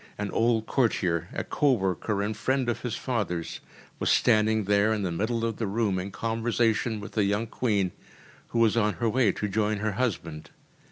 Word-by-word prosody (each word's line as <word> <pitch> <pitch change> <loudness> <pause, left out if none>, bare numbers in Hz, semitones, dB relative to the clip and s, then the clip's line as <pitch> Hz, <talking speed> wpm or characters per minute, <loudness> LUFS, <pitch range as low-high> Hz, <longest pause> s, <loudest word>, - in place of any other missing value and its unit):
An 105 -1 -3
old 115 -1 +2
courtier, 90 - +1
a - - -3
co 145 -2 +2
worker 100 0 -1
and 105 +1 -2
friend 130 +4 0
of 120 - -2
his 120 -3 -3
father’s, 100 -10 -3 0.4
was - - 0
standing 110 0 +3
there 100 +2 +3
in 105 -2 -2
the 90 - -1
middle 115 +6 -1
of 115 -2 -2
the 110 - -2
room 100 -2 0
in 95 +2 -4
conversation 115 +1 0
with 105 - -8
the 105 - +1
young 100 +3 +1
Queen, 105 -5 0 0.6
who - - -4
was 115 -2 +4
on 105 -2 +2
her 120 - -1
way 115 -2 +3
to 105 - -3
join 105 +1 0
her 105 +1 -1
husband. 90 -10 -3
110 Hz, 190 wpm, -27 LUFS, 100-115 Hz, 0.6 s, was